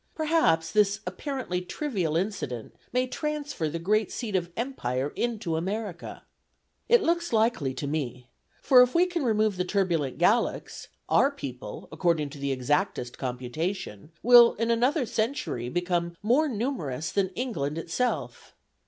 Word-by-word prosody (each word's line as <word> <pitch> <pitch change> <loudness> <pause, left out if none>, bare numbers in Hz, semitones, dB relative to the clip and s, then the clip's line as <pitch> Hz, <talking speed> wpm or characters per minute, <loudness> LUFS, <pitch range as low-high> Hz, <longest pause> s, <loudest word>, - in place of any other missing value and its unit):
Perhaps 310 - +2
this 210 -1 +3
apparently 185 -1 -3
trivial 180 - -2
incident 175 - -3 0.2
may 250 0 +1
transfer 290 - -3
the 165 - -3
great 210 +5 +1
seat 220 -5 -4
of 175 -2 0
empire 145 - -2
into 220 -9 -1
America. 195 +2 -4 0.7
It 475 -2 +6
looks 340 +1 0
likely 220 - +1
to 145 - -4
me; 130 -4 -3 0.4
for 255 -3 +7
if 250 +3 +3
we 350 +2 +5
can 350 -4 -2
remove 215 -4 +2
the 180 - +1
turbulent 175 -8 0
Gallicks, 215 +7 +1 0.2
our 275 - +4
people, 135 - -7
according 160 -3 0
to 145 - -10
the 140 0 -1
exactest 130 0 -1
computation, 130 - -4
will 240 0 +8
in 230 +2 0
another 250 +5 +2
century 220 - -2
become 175 +1 -1
more 270 +8 +3
numerous 185 - -3
than 195 -2 +1
England 160 - -2
itself. 170 +10 -3
195 Hz, 140 wpm, -27 LUFS, 155-245 Hz, 0.7 s, will